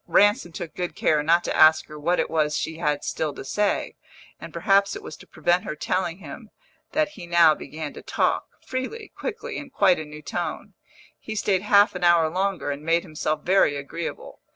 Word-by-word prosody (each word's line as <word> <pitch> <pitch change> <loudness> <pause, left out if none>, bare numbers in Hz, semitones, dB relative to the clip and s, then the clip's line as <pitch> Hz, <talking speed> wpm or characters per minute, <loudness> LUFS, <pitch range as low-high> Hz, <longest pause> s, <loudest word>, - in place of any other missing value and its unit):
Ransom 205 -2 +3
took 165 0 -7
good 180 -1 -4
care 150 -1 +2
not 170 +3 +3
to - - -2
ask 155 0 +6
her 150 -1 -10
what 175 +4 +1
it - - +1
was 150 -2 0
she 160 0 -4
had 150 -3 0
still 150 -3 -2
to - - -8
say, 205 +8 0 0.5
and - - -9
perhaps 200 -1 +2
it - - -8
was - - -8
to - - -16
prevent 175 +3 +1
her - - -5
telling 180 +1 -2
him 190 +5 -10 0.4
that 305 0 +2
he 185 -12 -11
now 170 -2 +6
began 155 -1 -7
to - - -10
talk, - - 0 0.2
freely, 260 - -5
quickly, 470 0 -5
in 285 - -7
quite 195 - +3
a - - -4
new 150 0 -11
tone. - - -4 0.5
He 220 - -7
stayed 200 -3 +1
half 205 0 +5
an 180 -1 -5
hour 170 -2 +4
longer, 190 -4 -1
and 140 0 -5
made 165 +2 +1
himself 155 -2 -3
very 185 -5 +3
agreeable. 145 +4 -6
175 Hz, 200 wpm, -24 LUFS, 155-200 Hz, 0.5 s, ask